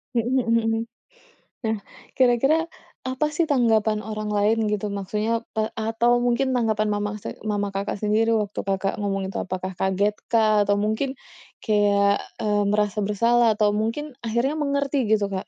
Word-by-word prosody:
Hmm 235 Hz, +1 st, +1 dB
hmm 255 Hz, -3 st, +1 dB, 0.2 s
hmm. 225 Hz, 0 st, 0 dB, 0.8 s
Nah, 220 Hz, 0 st, 0 dB, 0.4 s
kira-kira 270 Hz, +6 st, +3 dB, 0.4 s
apa 260 Hz, +3 st, 0 dB
sih 335 Hz, -, +2 dB
tanggapan 220 Hz, -5 st, +2 dB
orang 215 Hz, 0 st, -4 dB
lain 215 Hz, +2 st, +3 dB
gitu 210 Hz, 0 st, -1 dB
maksudnya, 210 Hz, +3 st, -2 dB, 0.3 s
eee, 215 Hz, 0 st, 0 dB
atau 225 Hz, +2 st, +1 dB
mungkin 245 Hz, +2 st, +1 dB
tanggapan 220 Hz, -3 st, +1 dB
mama 205 Hz, 0 st, -1 dB
se -, -, -4 dB, 0.2 s
mama 205 Hz, -1 st, -1 dB
Kakak 200 Hz, +1 st, -3 dB
sendiri 215 Hz, +2 st, +2 dB
waktu 205 Hz, 0 st, -5 dB
Kakak 195 Hz, 0 st, 0 dB
ngomong 195 Hz, -1 st, -1 dB
itu 190 Hz, -, -5 dB
apakah 185 Hz, 0 st, -4 dB
kaget 190 Hz, +2 st, +1 dB, 0.2 s
kah? 215 Hz, -2 st, +4 dB
Atau 205 Hz, 0 st, +2 dB
mungkin 220 Hz, +6 st, -1 dB, 0.5 s
kayak, 205 Hz, -1 st, +3 dB, 0.2 s
eee, 205 Hz, -1 st, +1 dB
merasa 210 Hz, 0 st, 0 dB
bersalah 230 Hz, +4 st, +3 dB
atau 210 Hz, -1 st, +3 dB
mungkin 230 Hz, +7 st, -2 dB, 0.2 s
akhirnya 235 Hz, +6 st, 0 dB
mengerti 280 Hz, 0 st, 0 dB
gitu 215 Hz, -2 st, +3 dB
Kak? 190 Hz, -, -4 dB
215 Hz, 155 wpm, -24 LUFS, 205-235 Hz, 0.8 s, kah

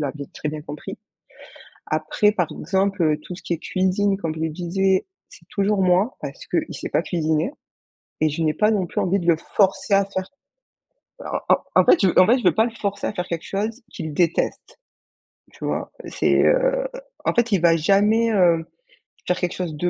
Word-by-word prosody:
l'avait 145 Hz, -1 st, -4 dB
très 150 Hz, -, -4 dB
bien 150 Hz, 0 st, -5 dB
compris. 145 Hz, 0 st, -8 dB, 0.9 s
Après 155 Hz, +7 st, +1 dB
par 180 Hz, -5 st, 0 dB
exemple 190 Hz, -3 st, 0 dB
tout 180 Hz, -, -8 dB
ce -, -, -12 dB
qui 170 Hz, -, -2 dB
est -, -, -6 dB
cuisine 190 Hz, +3 st, 0 dB
comme 165 Hz, -5 st, -3 dB
je 160 Hz, -, -7 dB
le 160 Hz, -, -1 dB
disais, 185 Hz, -, 0 dB, 0.2 s
c'est 170 Hz, -, -17 dB
toujours 200 Hz, -1 st, 0 dB
moi 185 Hz, +7 st, +2 dB
parce -, -, -8 dB
qu'il -, -, -2 dB
sait -, -, -6 dB
pas -, -, +2 dB
cuisiner 160 Hz, +1 st, 0 dB, 0.7 s
et 155 Hz, -, +3 dB
je 160 Hz, +3 st, -3 dB
n'ai 155 Hz, -1 st, +1 dB
pas 210 Hz, +5 st, +3 dB
non 195 Hz, -5 st, 0 dB
plus -, -, -3 dB
envie 190 Hz, +2 st, +1 dB
de 170 Hz, -, -5 dB
le 165 Hz, -, +5 dB
forcer 195 Hz, +4 st, 0 dB
à 195 Hz, 0 st, +3 dB
faire 190 Hz, +1 st, -5 dB, 0.9 s
bah, -, -, -5 dB
en -, -, +6 dB, 0.2 s
en -, -, +7 dB
fait 265 Hz, -, +5 dB
en 185 Hz, -, +7 dB
fait, 245 Hz, +4 st, +4 dB
je 240 Hz, -, -7 dB
veux 175 Hz, -3 st, +4 dB
pas 220 Hz, -, +4 dB
le 235 Hz, -, -2 dB
forcer 200 Hz, -3 st, -3 dB
à -, -, -3 dB
faire 180 Hz, -2 st, -4 dB
quelque 165 Hz, -1 st, -4 dB
chose 220 Hz, +5 st, -3 dB
qu'il 160 Hz, -3 st, -6 dB
déteste. 170 Hz, +1 st, -1 dB, 0.8 s
Tu -, -, -13 dB
vois? -, -, -3 dB, 0.2 s
C'est -, -, +2 dB
heu -, -, +2 dB, 0.4 s
en -, -, +2 dB
fait 235 Hz, -1 st, +1 dB
il 185 Hz, -, +3 dB
va 165 Hz, -1 st, +5 dB
jamais, 210 Hz, +7 st, +3 dB
heu, 170 Hz, -4 st, +3 dB, 0.6 s
faire 180 Hz, -, +1 dB
quelque 180 Hz, -2 st, -1 dB
chose 175 Hz, -4 st, -4 dB
de 175 Hz, +4 st, -1 dB
185 Hz, 200 wpm, -22 LUFS, 165-205 Hz, 0.9 s, en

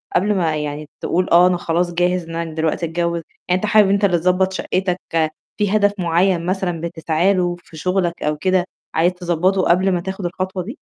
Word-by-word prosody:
قبل 210 Hz, +3 st, +3 dB
ما 165 Hz, -4 st, +1 dB
يعني 150 Hz, 0 st, -4 dB
تقول 180 Hz, +1 st, 0 dB
آه، 175 Hz, +2 st, +7 dB
أنا 180 Hz, -1 st, +1 dB
خلاص 175 Hz, +1 st, -1 dB
جاهز 180 Hz, 0 st, +1 dB
إن 165 Hz, -, -6 dB
أنا 165 Hz, -1 st, -4 dB
دلوقتي 160 Hz, +1 st, -1 dB
أتجوّز؟ 170 Hz, +1 st, -1 dB, 0.3 s
يعني 180 Hz, +1 st, +1 dB
أنت -, -, -1 dB
حابب 210 Hz, -2 st, +5 dB
أنت 200 Hz, +1 st, +3 dB
اللي 175 Hz, -3 st, +3 dB
تضبّط 185 Hz, +2 st, +1 dB
شَقّتك، 185 Hz, -1 st, -1 dB, 0.6 s
في 210 Hz, 0 st, +1 dB
هدف 205 Hz, -1 st, +3 dB
معيّن 175 Hz, 0 st, +1 dB
مثلًا 180 Hz, -3 st, -2 dB
بتسعى 170 Hz, +3 st, 0 dB
له 175 Hz, -1 st, 0 dB
في 160 Hz, -, -14 dB
شُغلك 180 Hz, 0 st, -1 dB
أو 150 Hz, 0 st, 0 dB
كده 185 Hz, +1 st, +1 dB, 0.3 s
عايز 175 Hz, +3 st, +2 dB
تضبّطه 180 Hz, +2 st, 0 dB
قبل 185 Hz, +2 st, +3 dB
ما 175 Hz, -1 st, 0 dB
تاخد 190 Hz, 0 st, -5 dB
الخطوة 185 Hz, +1 st, -3 dB
دي؟ 225 Hz, +7 st, -7 dB
180 Hz, 200 wpm, -19 LUFS, 170-190 Hz, 0.6 s, آه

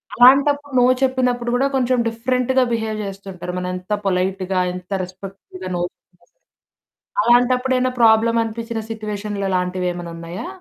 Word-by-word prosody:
అలాంటప్పుడు 280 Hz, +3 st, +5 dB
నో 245 Hz, -, +5 dB, 0.2 s
చెప్పినప్పుడు 250 Hz, -2 st, +1 dB
గూడా 265 Hz, +2 st, +2 dB
కొంచెం 255 Hz, -1 st, +2 dB
డిఫరెంట్‌గా 250 Hz, +3 st, +1 dB
బిహేవ్ 220 Hz, -2 st, -1 dB
జేస్తుంటారు. 195 Hz, -2 st, -7 dB
మనెంత 180 Hz, +2 st, -5 dB
పొలైట్‌గా, 190 Hz, 0 st, 0 dB
ఎంత 180 Hz, 0 st, -9 dB
రెస్పెక్టబుల్‌గా 185 Hz, 0 st, -9 dB
నో 175 Hz, -, -1 dB
చెప్పినా. 175 Hz, -, -13 dB, 1.1 s
అలాంటప్పుడు 250 Hz, +3 st, +3 dB
ఏవన్నా 255 Hz, 0 st, 0 dB
ప్రాబ్లమ్ 230 Hz, 0 st, +5 dB
అనిపిచ్చిన 230 Hz, 0 st, -4 dB
సిచ్యువేషన్‌లా 210 Hz, -2 st, -4 dB
లాంటివేమన్నా 180 Hz, -1 st, -2 dB
ఉన్నాయా? 170 Hz, -, -7 dB
220 Hz, 120 wpm, -20 LUFS, 185-250 Hz, 1.1 s, అలాంటప్పుడు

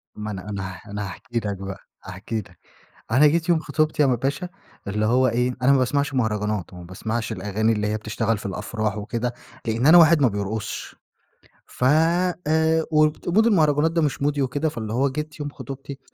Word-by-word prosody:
ما 105 Hz, 0 st, -5 dB
أنا 95 Hz, +1 st, -7 dB
أنا 100 Hz, -2 st, -4 dB
ه 90 Hz, -, -12 dB
أنا 105 Hz, 0 st, -3 dB
هاحكِي 115 Hz, +6 st, -4 dB
لك 100 Hz, -3 st, -4 dB
بقى، 95 Hz, 0 st, -7 dB, 0.2 s
هاحكِي 95 Hz, +4 st, -5 dB
لك، 90 Hz, -4 st, -12 dB, 0.5 s
أنا 135 Hz, +6 st, +6 dB
جيت 160 Hz, +3 st, +2 dB
يوم 170 Hz, -2 st, +4 dB
خطوبتي 155 Hz, -1 st, 0 dB
يا 145 Hz, -, +5 dB
م 125 Hz, -, +2 dB
باشا 140 Hz, +8 st, -2 dB, 0.4 s
اللي 105 Hz, +2 st, 0 dB
هو 130 Hz, +2 st, +3 dB
إيه، 125 Hz, +2 st, 0 dB
أنا 135 Hz, +2 st, +5 dB
ما 135 Hz, -, +4 dB
باسمعش 140 Hz, +2 st, 0 dB
مهرجانات، 105 Hz, -6 st, -1 dB
وما 90 Hz, -1 st, -10 dB
باسمعش 110 Hz, +6 st, -4 dB
الأغاني 110 Hz, +2 st, 0 dB
اللي 105 Hz, -1 st, -1 dB
هي 105 Hz, +1 st, 0 dB
بتشتغل 110 Hz, +1 st, -1 dB
في 100 Hz, -, -7 dB
الأفراح 105 Hz, +2 st, -3 dB
وكده، 120 Hz, +3 st, -3 dB, 0.3 s
لإن 115 Hz, +3 st, 0 dB
أنا 165 Hz, +3 st, +9 dB
واحد 165 Hz, -1 st, +6 dB
ما 130 Hz, -, +6 dB
بيرقصش 105 Hz, +1 st, -4 dB, 0.7 s
ف -, -, -7 dB
آآ 160 Hz, +1 st, +2 dB
وت 155 Hz, 0 st, +2 dB
ومود 215 Hz, +6 st, +4 dB
المهرجانات 155 Hz, -6 st, +3 dB
ده 165 Hz, 0 st, +1 dB
مش 145 Hz, -3 st, -1 dB
مودي 145 Hz, 0 st, +1 dB
وكده، 145 Hz, +4 st, 0 dB
فاللي 110 Hz, -5 st, -5 dB
هو 135 Hz, +4 st, +2 dB
جيت 150 Hz, +3 st, -5 dB
يوم 145 Hz, -1 st, -3 dB
خطوبتي 135 Hz, 0 st, -8 dB
125 Hz, 195 wpm, -23 LUFS, 105-150 Hz, 0.7 s, أنا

